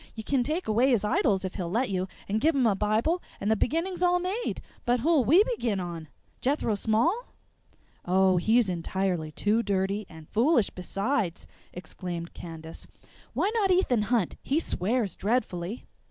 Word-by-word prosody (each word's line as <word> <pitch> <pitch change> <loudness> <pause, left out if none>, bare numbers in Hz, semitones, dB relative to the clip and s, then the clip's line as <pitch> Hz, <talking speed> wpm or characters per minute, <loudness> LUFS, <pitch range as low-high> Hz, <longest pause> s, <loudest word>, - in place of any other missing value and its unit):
You 220 - -6
can 270 +3 +1
take 310 +8 -2
away 235 +5 +3
his 235 -6 +2
idols 200 -2 +1
if 185 - -4
he'll 180 -4 -4
let 230 +5 0
you 185 0 -1 0.2
and 215 +2 0
give 320 +2 +3
him 265 -3 +3
a 220 - +4
bible 215 - +1 0.2
and 205 +2 0
the - - +4
beginning's 335 - -1
all 355 0 +4
made. 375 +7 -2 0.2
But 245 0 +1
who'll 315 -2 +3
we 325 - +6
begin 245 - -1
on? 170 -3 -5 0.3
Jethro 265 -4 +1
Small?" 235 - +1 0.8
"Oh, 185 +1 +3
he's 220 +5 +3
entirely 180 -2 -2
too 210 +8 +1
dirty, 200 -1 -1
and 160 -2 -12
foolish 235 -1 +2
besides!" 195 +1 -2 0.3
exclaimed 175 -1 -6
Candace. 165 -1 -9 0.5
"Why 405 - +1
not 425 -4 +2
Ethan 360 - +3
Hunt? 230 -8 +1
He 285 +4 +1
swears 215 - -1
dreadfully." 205 -2 -2
215 Hz, 165 wpm, -27 LUFS, 185-280 Hz, 0.8 s, we